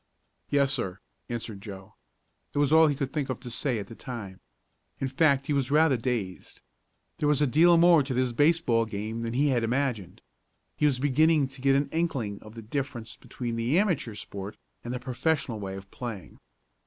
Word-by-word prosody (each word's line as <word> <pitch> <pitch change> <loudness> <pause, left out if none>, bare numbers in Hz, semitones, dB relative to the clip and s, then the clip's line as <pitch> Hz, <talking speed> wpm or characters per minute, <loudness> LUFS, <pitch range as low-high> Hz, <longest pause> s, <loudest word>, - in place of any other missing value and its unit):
"Yes, 140 -1 +3
sir," 95 -8 -2 0.3
answered 110 -4 -5
Joe. 95 -2 -10 0.6
It - - -2
was 145 +1 +3
all 160 0 +7
he 145 - +1
could 135 -1 -3
think 145 -4 -2
of 130 - -3
to 120 - -8
say 120 +1 -1
at 100 - -4
the 115 - -11
time. 110 -6 -8 0.6
In 135 - -1
fact 140 0 +2
he 150 - -1
was 140 -3 0
rather 150 -1 +4
dazed. 115 -6 -4 0.6
There 150 - +2
was 150 -2 +3
a 150 - +4
deal 165 +6 +5
more 170 -2 +6
to 135 -1 -3
this 125 -1 +1
baseball 145 -5 +3
game 110 +2 -4
than 115 0 -3
he 145 +4 +2
had 120 -3 +1
imagined. 115 -6 -2 0.5
He 150 - +2
was 135 -3 +1
beginning 145 +2 +3
to 135 0 -11
get 135 0 +4
an 140 +1 +2
inkling 135 -12 -2
of 110 +1 -13
the 115 - -8
difference 125 -1 -4
between 120 -2 -5
the 120 +8 +1
amateur 175 - 0
sport 100 0 -7 0.3
and 120 - -5
the 125 - -3
professional 130 -1 -1
way 95 -1 -5
of 95 0 -10
playing. 115 -7 -7
130 Hz, 195 wpm, -27 LUFS, 115-145 Hz, 0.6 s, all